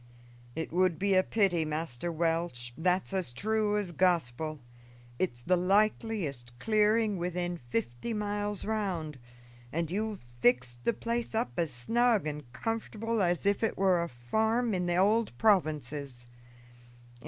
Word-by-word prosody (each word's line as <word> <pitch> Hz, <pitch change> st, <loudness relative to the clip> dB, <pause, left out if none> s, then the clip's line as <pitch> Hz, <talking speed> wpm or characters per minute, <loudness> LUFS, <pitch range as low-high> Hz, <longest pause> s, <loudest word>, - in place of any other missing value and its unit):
"It 160 Hz, 0 st, -4 dB
would 180 Hz, -2 st, +3 dB
be 200 Hz, +3 st, +2 dB
a 185 Hz, -, +6 dB
pity, 190 Hz, -5 st, +2 dB
Master 155 Hz, 0 st, -3 dB
Welch, 165 Hz, -7 st, -1 dB
that's 180 Hz, +4 st, 0 dB
as 185 Hz, -10 st, -2 dB
true 215 Hz, -, +1 dB
as 200 Hz, -4 st, -2 dB
Gospel. 160 Hz, -4 st, 0 dB, 0.6 s
It's 120 Hz, -10 st, -2 dB
the 180 Hz, -, +3 dB
likeliest 180 Hz, -, 0 dB
clearing 215 Hz, -, +2 dB
within 175 Hz, 0 st, -2 dB
fifty 120 Hz, -, -2 dB
miles 205 Hz, -1 st, -2 dB
round, 185 Hz, -10 st, -2 dB, 0.5 s
and 165 Hz, +1 st, -2 dB
you've 210 Hz, -, -3 dB
fixed 120 Hz, 0 st, +2 dB
the 235 Hz, -, +3 dB
place 235 Hz, 0 st, -3 dB
up 220 Hz, -, 0 dB
as 165 Hz, -2 st, 0 dB
snug 225 Hz, -, +2 dB
and 150 Hz, -4 st, -5 dB
comfortable 225 Hz, -, -2 dB
as 175 Hz, 0 st, +1 dB
if 200 Hz, 0 st, +2 dB
it 225 Hz, -, 0 dB
were 185 Hz, -3 st, +3 dB
a 170 Hz, -, -3 dB
farm 220 Hz, -, 0 dB
in 180 Hz, -1 st, 0 dB
the 175 Hz, -, +1 dB
old 210 Hz, -, +2 dB
provinces. 145 Hz, -, +1 dB
180 Hz, 140 wpm, -30 LUFS, 150-210 Hz, 0.6 s, a